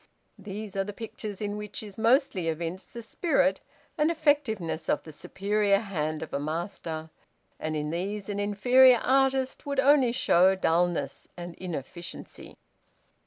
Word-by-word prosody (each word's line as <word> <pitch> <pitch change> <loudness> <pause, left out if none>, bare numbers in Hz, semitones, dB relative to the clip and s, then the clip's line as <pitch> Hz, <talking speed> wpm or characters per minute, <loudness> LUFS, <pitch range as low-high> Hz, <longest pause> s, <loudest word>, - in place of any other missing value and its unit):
These 205 0 -7
are 195 - +1
the 205 +1 -6
pictures 215 -2 -6
in 205 0 -3
which 210 0 -6
is 205 -2 -10
mostly 230 - +2
evinced 165 +3 -4
the 235 - -8
spirit 280 +3 +1 0.4
and 300 +1 +4
effectiveness 285 - 0
of - - +1
the 160 - -10
superior 200 +5 +1
hand 155 -7 -3
of - - -10
a - - 0
master; 160 0 -4 0.5
and 155 0 -3
in 150 0 -2
these 195 +4 -3
an 205 -1 -3
inferior 245 +5 +5
artist 265 0 +1
would 280 -1 -1
only 270 -3 +5
show 190 -6 +4
dulness 170 -5 0
and 175 -1 -7
inefficiency. 170 -1 -8
200 Hz, 145 wpm, -28 LUFS, 170-240 Hz, 0.5 s, inferior